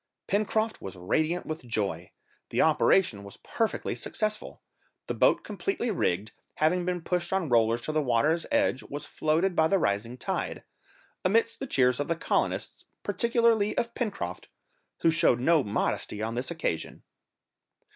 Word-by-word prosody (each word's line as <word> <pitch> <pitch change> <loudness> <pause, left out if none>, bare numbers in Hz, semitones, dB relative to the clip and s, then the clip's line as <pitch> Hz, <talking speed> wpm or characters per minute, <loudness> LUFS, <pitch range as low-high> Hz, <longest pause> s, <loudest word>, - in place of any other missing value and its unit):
Pencroft 215 +2 0
was 95 -1 -7
radiant 155 - 0
with 155 -2 -5
joy, 100 -7 -2 0.4
the - - -2
operation 115 - +3
was 100 - -10
perfectly 225 -1 -2
successful; 215 -1 -3 0.5
the - - -3
boat - - +3
completely 345 - -2
rigged, 105 - -1 0.2
having 175 +3 +2
been 180 -2 -2
pushed 175 0 -1
on 190 -5 0
rollers 115 0 +3
to 155 - -3
the 155 0 +1
water's 150 +6 +1
edge, 290 - +2
was 145 +1 -7
floated 165 +4 0
by 160 -1 +4
the 195 - +3
rising 115 - -1
tide, - - -3 0.6
amidst 225 +4 +2
the 270 - -4
cheers 125 - +3
of 145 - -1
the 170 - 0
colonists, 165 - -1 0.2
particularly 230 +1 +2
of 235 0 -1
Pencroft, 90 - -4 0.5
who 165 - +4
showed 160 -6 +4
no 155 +3 +4
modesty 105 0 -2
on 110 +1 -2
this 125 +2 -3
occasion. 160 - -3
160 Hz, 150 wpm, -28 LUFS, 115-195 Hz, 0.6 s, by